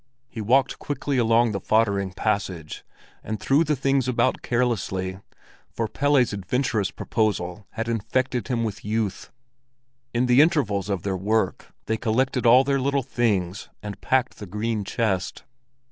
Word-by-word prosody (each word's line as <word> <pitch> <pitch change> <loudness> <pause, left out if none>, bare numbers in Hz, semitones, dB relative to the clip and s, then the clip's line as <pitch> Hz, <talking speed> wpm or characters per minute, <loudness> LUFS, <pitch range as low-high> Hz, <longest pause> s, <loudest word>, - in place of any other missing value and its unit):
He 115 -2 -7
walked 130 +5 +2
quickly 145 -2 -2
along 115 0 +3
the 100 - -2
foddering 100 -2 +1
passage, 95 -6 -2 0.4
and 110 -1 -4
threw 140 +4 +3
the 150 -1 0
things 135 -1 +1
about 125 - +1
carelessly, 95 -6 -1 0.5
for 115 - -2
Pelle's 135 -1 +2
adventurous 100 0 -1
proposal 100 -3 -2
had 115 0 -3
infected 120 +2 -1
him 120 -2 0
with 100 -4 -4
youth. 105 -1 -2 0.8
In 120 +2 +1
the 125 +2 +6
intervals 115 - +1
of 95 -4 -2
their 95 -1 -1
work, 100 +1 -1
they 110 - 0
collected 125 +2 +1
all 125 +3 +7
their 140 0 +1
little 140 0 +1
things 100 -7 -1
and 105 -1 -7
packed 130 -1 0
the 105 - -7
green 105 +2 -2
chest. 95 -3 -2
115 Hz, 145 wpm, -24 LUFS, 100-125 Hz, 0.8 s, all